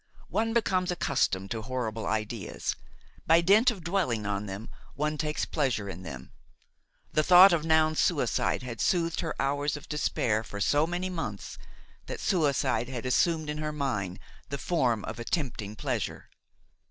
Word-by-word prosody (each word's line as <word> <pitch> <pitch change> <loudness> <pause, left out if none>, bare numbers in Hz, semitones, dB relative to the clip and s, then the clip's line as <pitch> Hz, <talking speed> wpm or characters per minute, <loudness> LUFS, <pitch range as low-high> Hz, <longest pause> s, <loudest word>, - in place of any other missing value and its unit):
One 225 +1 0
becomes 190 -6 +1
accustomed 100 - 0
to 115 -2 -2
horrible 115 -2 -3
ideas; 110 -1 -2 0.5
by 165 +1 +6
dint 205 +8 +5
of 200 -8 -5
dwelling 170 - 0
on 100 0 -2
them 100 +3 -7 0.2
one 150 +1 -1
takes 150 0 -1
pleasure 130 -9 -1
in 95 -2 -7
them. 65 -8 -8 0.8
The 155 - +4
thought 180 +3 +8
of 160 -2 0
Noun's 155 -1 +3
suicide - - +1
had 120 -4 -5
soothed 170 - +1
her 160 - -3
hours 145 +2 0
of 145 - -12
despair 115 -7 0
for 100 -2 -7
so 145 +9 +3
many 180 +2 -2
months, 110 - -5 0.5
that - - -5
suicide 145 -7 +1
had 125 -2 -5
assumed 155 +5 +2
in 150 0 -3
her 155 0 -2
mind 105 -11 -2 0.3
the 140 - -3
form 125 - 0
of 110 +1 -6
a - - -4
tempting 115 - -3
pleasure. - - -3
145 Hz, 160 wpm, -28 LUFS, 110-165 Hz, 0.8 s, thought